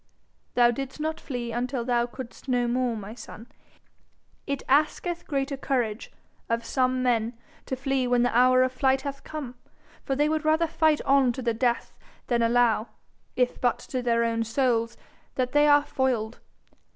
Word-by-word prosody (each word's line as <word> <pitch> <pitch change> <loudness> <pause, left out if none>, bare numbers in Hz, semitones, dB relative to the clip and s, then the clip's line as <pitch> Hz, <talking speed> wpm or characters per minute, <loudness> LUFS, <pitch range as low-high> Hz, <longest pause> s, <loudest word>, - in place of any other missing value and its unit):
'Thou 240 -1 +5
didst 270 +3 -6
not 315 +1 -2
flee 245 -4 -5
until 245 +1 -2
thou 240 -1 +1
couldst 250 +1 -10
no 245 -2 +1
more, 245 -1 0
my 210 +1 -7
son. 225 -1 -11 1.0
It 280 -2 -2
asketh 310 +5 +1
greater 275 -1 -1
courage 245 -5 -2 0.4
of 230 0 -1
some 255 0 +1
men 235 -1 0 0.3
to 260 - -2
flee 270 -1 -1
when 245 0 +3
the 245 -2 0
hour 255 +1 +5
of 255 - 0
flight 265 +1 +1
hath 280 0 -6
come, 290 -6 -6 0.5
for 270 - -1
they 295 +2 +2
would 310 0 0
rather 315 +2 +3
fight 315 -1 +2
on 275 -2 +4
to 260 - -6
the 235 -1 +1
death 240 +1 0 0.3
than 240 -1 +1
allow, 230 -1 +3 0.5
if 250 -1 0
but 245 -1 +2
to 255 - -4
their 235 -1 +2
own 230 0 0
souls, 230 -1 0 0.4
that 250 -1 -1
they 295 +1 +4
are 290 0 +5
foiled. 245 -5 -1
255 Hz, 170 wpm, -26 LUFS, 235-275 Hz, 1.0 s, Thou